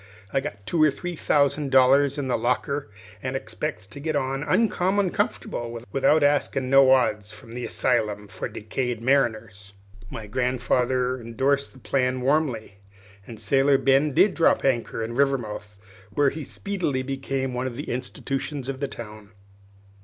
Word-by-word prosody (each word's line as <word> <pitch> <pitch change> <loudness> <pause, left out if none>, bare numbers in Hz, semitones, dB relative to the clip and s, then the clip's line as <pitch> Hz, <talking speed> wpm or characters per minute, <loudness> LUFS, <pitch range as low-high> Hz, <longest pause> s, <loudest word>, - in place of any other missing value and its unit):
I've 135 - +2
got 100 -8 -7
two 155 +9 0
or 155 - +6
three 175 +5 -5
thousand 145 -1 +1
dollars 135 +2 +5
in 145 - -2
the 130 - 0
locker, 125 +1 -1 0.3
an' 130 +1 -3
expects 95 -7 -4
to 105 +8 -10
get 155 +1 -2
on 135 -1 -1
uncommon 190 +3 +1
comfortable 120 0 -2
without 145 +3 +3
askin' 140 -2 +1
no 135 -1 +7
odds 110 -5 +2
from 110 +2 -13
the 125 0 -4
Assylum 105 -3 0
for 100 - -5
Decayed 120 +2 -3
Mariners." 110 -6 0 0.4
My 110 - -7
grandfather 125 +2 0
indorsed 135 +5 0
the - - -16
plan 130 +1 0
warmly, 125 -8 0 0.5
and 115 -3 -9
Sailor 135 +6 +3
Ben 135 +3 +3
did 200 - +5
drop 165 - +2
anchor 120 -3 0
in 115 +1 -4
Rivermouth, 120 -6 -1 0.3
where 140 +6 +2
he 155 -1 -6
speedily 175 -10 -2
became 135 -1 -3
one 125 +1 -2
of 125 - -6
the 145 - -6
institutions 135 +2 -4
of 135 -1 -4
the 140 - -1
town. 105 -4 -10
130 Hz, 155 wpm, -25 LUFS, 115-140 Hz, 0.5 s, no